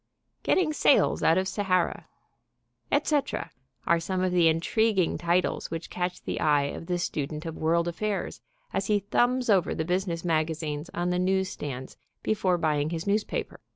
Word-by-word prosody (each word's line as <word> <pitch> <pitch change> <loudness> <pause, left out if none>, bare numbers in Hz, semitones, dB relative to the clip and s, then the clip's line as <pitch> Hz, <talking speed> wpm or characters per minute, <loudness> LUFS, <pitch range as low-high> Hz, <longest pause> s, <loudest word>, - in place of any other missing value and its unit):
"Getting 330 -5 +2
Sales 285 - +3
Out 165 - +4
of 190 0 +1
Sahara," 185 -3 0 0.8
etc., 290 -2 0 0.3
are 170 0 +3
some 185 +2 -2
of 185 - +1
the 175 -2 +4
intriguing 185 +4 +2
titles 175 +1 0
which 165 0 -6
catch 180 0 -3
the - - -3
eye 150 -2 +3
of 165 - -8
the 180 -1 0
student 155 -2 -3
of 165 -1 -5
world 170 +2 +1
affairs 205 +4 -3 0.3
as 195 - -1
he 210 - +3
thumbs 245 +5 +1
over 195 -5 +3
the 160 - -2
business 180 -1 -1
magazines 155 -1 -1
on 175 +1 0
the 180 - 0
news 190 +1 +1
stands 130 -3 -6 0.3
before 190 -4 +1
buying 155 -3 +1
his 165 -1 -4
newspaper. 210 +1 -1
175 Hz, 160 wpm, -27 LUFS, 160-195 Hz, 0.8 s, Out